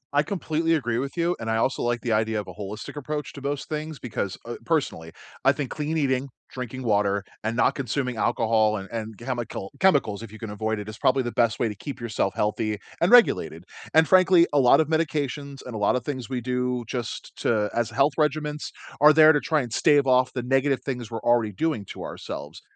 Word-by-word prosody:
I 145 - +6
completely 165 -1 0
agree 120 -5 -1
with 140 +5 -5
you, 170 +1 +1
and 115 0 -4
I 110 - +1
also 130 +4 0
like 120 0 0
the 120 - -2
idea 110 0 +1
of 105 - -6
a - - -8
holistic 105 +5 -7
approach 150 0 -4
to 140 - -10
most 140 0 -3
things 155 0 -4
because, 105 -7 -4
uh 120 0 -5
personally, 135 - -1 0.3
I - - +6
think 140 -4 -4
clean 155 +1 -2
eating, 135 -2 0 0.2
drinking 130 0 -6
water, 100 -3 +1 0.2
and 110 +2 -1
not - - +3
consuming 125 -1 -2
alcohol, 110 -1 +2
and 95 -1 -7
and 110 -2 -5
chemical 120 -5 -5
chemicals, 140 - +3
if 115 -2 -9
you 110 - -10
can 110 -2 -7
avoid 110 +1 -2
it, 105 - -7
is 110 0 -8
probably 130 0 +3
the 120 - -3
best 115 -2 +1
way 120 - +2
to 105 - -5
keep 135 +6 -7
yourself 110 -4 -2
healthy 105 0 -1 0.2
and 170 - +3
regulated. 85 - +4 0.3
And 160 0 +6
frankly, 185 -2 +6
a 145 - +4
lot 125 -2 +6
of 160 - +2
medications 145 -3 -2
and 125 - -7
a 110 - -4
lot 105 +4 +2
of 125 -1 -3
things 130 -5 -4
we 125 -2 -2
do 125 0 -1
just 120 -2 -5
to 105 -3 0
as 120 -2 0
health 140 +5 +2
regiments 150 -1 -1 0.3
are 150 +1 +8
there 155 0 +7
to 145 - +2
try 155 +1 +1
and 120 -3 -6
stave 145 -3 +4
off 130 -1 +3
the 125 - -3
negative 135 +2 +1
things 125 -5 -4
we're 115 -1 -4
already 120 -3 +2
doing 135 - -2
to - - -8
ourselves. - - -7
125 Hz, 220 wpm, -25 LUFS, 110-145 Hz, 0.3 s, are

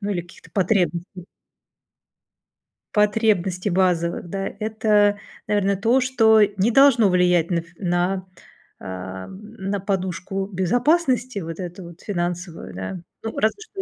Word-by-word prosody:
ну, 205 0 -3
или 180 - -1
каких-то 175 - -17
потребностей 180 -2 0 1.7
потребностей 210 -3 +1
базовых, 175 -2 +1
да, 195 0 -2
это, 210 -2 +2 0.3
наверно, 200 -1 +1
то, 230 +7 +3
что 225 -4 +4 0.2
не 200 +5 +2
должно 240 -5 +5
влиять 180 -2 +3
на 175 - +1
ф 170 - -5
на 180 +1 0 0.5
ам, 95 - -7 0.2
на 195 -1 -3
подушку 190 0 -3
безопасности 250 - +1
вот 165 -2 -7
эту 180 0 -6
вот 170 +1 -13
финансовую, 175 - -4
да. 95 - -5 0.2
Ну, 225 - -5
разве 220 - +1
что 420 -2 -7
190 Hz, 125 wpm, -22 LUFS, 175-215 Hz, 1.7 s, должно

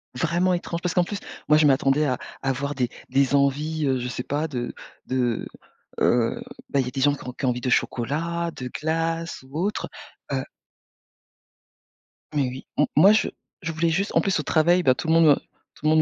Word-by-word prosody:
Vraiment 175 +6 +1
étrange, 170 -1 -3
parce 180 - -1
qu'en 180 - +4
plus, 205 +3 -4 0.3
moi 150 - +6
je 155 - +4
m'attendais 135 +2 +3
à 130 - +1 0.3
à 135 - -1
avoir 140 +2 -1
des 125 -3 0 0.2
des 135 +1 +2
envies, 150 +3 +1
heu, 130 -2 +1
je 125 - -3
sais 125 0 -4
pas, 150 +3 -1
de 125 -5 -4 0.3
de, 125 -3 -1 0.5
heu 120 - +2 0.3
ben, 140 - +1
il 130 - +1
y - - -6
a - - -4
des 135 0 -3
gens 145 +1 +4
qui 145 - -8
qui 135 - -2
ont - - +3
envie 125 0 -2
de 125 - -1
chocolat, 165 +9 0
de 125 -1 -5
glace 165 +2 -2
ou 135 +3 -9
autre. 205 +3 -1 0.4
Heu - - 0 1.9
Mais 140 -3 +2
oui, 130 +1 -9
m - - +5
moi 185 +7 +8
je 215 - +2 0.3
je 170 -2 -3
voulais 165 +1 +1
juste 190 +5 0
en - - +5
plus 195 -4 +1
au - - -2
travail, 175 +4 +3
bah 130 - +5
tout 160 - -5
le 160 - +3
monde 165 0 +6
me 145 -2 +7
tout - - -18
le - - +5
monde 155 0 +5
150 Hz, 215 wpm, -24 LUFS, 130-165 Hz, 1.9 s, moi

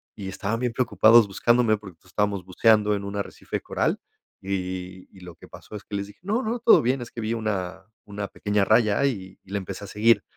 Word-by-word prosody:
y 100 - -7
estaban 105 +4 -3
bien 125 -2 -1
preocupados 115 -2 +5
buscándome 115 +2 +2
porque 95 -5 -13
estábamos 100 0 -1
buceando 105 +3 +3
en 100 -1 -3
un 100 - -5
arrecife 100 - -5
coral - - -1 0.4
y 100 +1 -4
y 90 0 -5
y 95 - -16
lo 85 - -10
que - - -15
pasó - - -12
es 105 - -7
que 100 - -6
les 100 0 -3
dije 105 - -16
no, 215 +6 0
no, 235 +2 -2
todo 235 - +6
bien, 125 +2 +1
es 120 - -8
que 115 - -6
vi 110 +2 -1
una 95 -4 -3 0.2
una 100 -1 -5
pequeña 105 +1 0
raya 110 +4 +3
y 95 -8 -3
y - - -21
la 100 - -1
empecé 95 +2 -7
a - - -10
seguir. 115 +4 +3
105 Hz, 225 wpm, -25 LUFS, 95-115 Hz, 0.4 s, todo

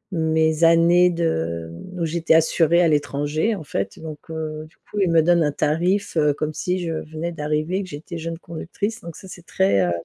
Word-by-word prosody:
mes 160 0 +1
années 170 +2 +5
de, 85 - -2
mmh, 180 - -10
où 170 - 0
j'étais 165 0 +2
assurée 165 +1 +3
à 170 - +4
l'étranger, 150 +6 0
en 180 - -7
fait 100 -8 -4
donc, 155 -2 -8
heu, 155 -1 -5
du - - -29 0.2
coup, 210 - -3
ils 190 -3 +2
me 165 -1 +4
donnent 175 0 +4
un 150 - +1
tarif, 175 +8 0
heu, 150 -1 +3
comme 155 0 -3
si 180 +4 -2
je 165 - -2 0.2
venais 165 +2 -4
d'arriver 155 +3 -2
et 200 - -2
que 185 - -10
j'étais 165 +3 -7
jeune 165 0 -5
conductrice 200 +7 -5
donc 170 -4 -9
ça, 190 - -12
c'est 175 -2 -11
très, 95 0 +2
heu, - - 0
160 Hz, 215 wpm, -22 LUFS, 150-170 Hz, 0.2 s, années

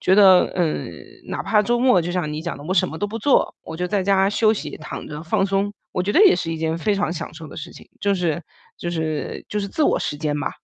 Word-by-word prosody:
觉 190 - +3
得 190 -3 +6
嗯， 170 -4 -1 0.4
哪 - - -3
怕 210 -1 +3
周 240 +3 +1
末 250 -7 +4
就 175 +1 -3
像 160 -5 -1
你 155 - -4
讲 170 +1 -4
的， 145 - -11
我 185 - -2
什 185 -1 +3
么 160 - -7
都 205 - -1
不 225 +2 -5
做， 270 +5 +2
我 160 - -8
就 180 - -1
在 200 +1 0
家 195 0 +3
休 215 +1 +3
息， - - -6
躺 150 - -7
着 150 0 -7
放 195 +4 +1
松， 195 +1 0 0.2
我 180 - 0
觉 200 - -1
得 410 - +6
也 375 - +7
是 165 - -3
一 165 - -2
件 160 +1 -1
非 210 +4 +1
常 200 -3 0
享 165 -1 -6
受 160 -1 -9
的 - - -11
事 155 - -7
情， - - -14
就 200 0 +2
是 170 -3 -1 0.4
就 175 - -3
是 160 -2 -3
就 210 - -1
是 200 - -3
自 310 - -1
我 - - +3
时 - - -2
间 150 -1 -2
吧。 - - -2
185 Hz, 300 characters per minute, -22 LUFS, 160-205 Hz, 0.4 s, 也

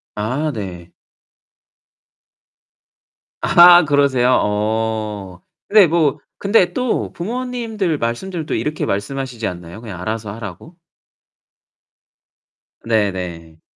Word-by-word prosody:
아 130 +9 -2
네. 90 -5 -7 2.5
아 175 0 +8
그러세요? 140 -4 +3
어. 105 -3 -2 0.3
근데 205 -4 +6
뭐 155 -4 +1 0.2
근데 195 -3 +2
또 250 -2 -1
부모님들 225 -4 -3
말씀들도 155 +8 -3
이렇게 150 +1 -2
말씀하시지 120 +3 -3
않나요 90 +4 -8
그냥 105 -7 -8
알아서 110 +2 -4
하라고? 110 - -9 2.1
네네. 90 -7 -2
115 Hz, 185 characters per minute, -19 LUFS, 100-170 Hz, 2.5 s, 아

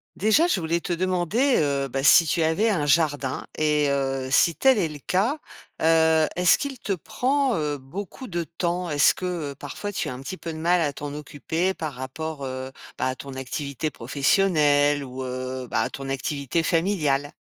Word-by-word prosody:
Déjà, 220 - +3
je 210 - +1
voulais 165 0 0
te 175 - -2
demander, 185 - +1
heu, 140 -2 0
bah, 135 +2 -2
si 165 +3 +7
tu 165 +2 0
avais 160 +8 +2
un 150 -7 0
jardin 145 -3 +1
et 150 -1 +2
heu, 135 -1 -1
si 165 +4 +4
tel 265 -4 +4
est 175 - +1
le 150 - -8
cas, 195 - 0 0.5
heu, 160 -1 +4
est-ce 180 -1 +5
qu'il 275 -3 -5
te 205 - -2
prend 260 - 0 0.2
beaucoup, 185 - -8
heu, - - -8
de 175 -3 -2
temps? 175 +2 -3
Est-ce 145 -2 +4
que, 175 -6 -4
heu, - - -10
parfois, 145 +10 -6
tu - - -3
as - - -4
un 125 - -9
petit 185 +7 -6
peu 165 - -6
de - - -7
mal 175 +2 +2
à 150 -3 +1
t'en 145 +1 -7
occuper 160 +5 -2
par 155 -3 -4
rapport, 140 +3 -6
heu, 130 0 -5 0.3
bah, - - -1
à 130 - -2
ton 135 0 -9
activité 140 +2 -4
professionnelle 145 - +2
ou, 130 0 -7
heu, 130 0 -5
bah, - - +1
à - - -1
ton 135 0 -6
activité 140 +3 -2
familiale? 155 -5 +1
155 Hz, 195 wpm, -24 LUFS, 140-180 Hz, 0.5 s, si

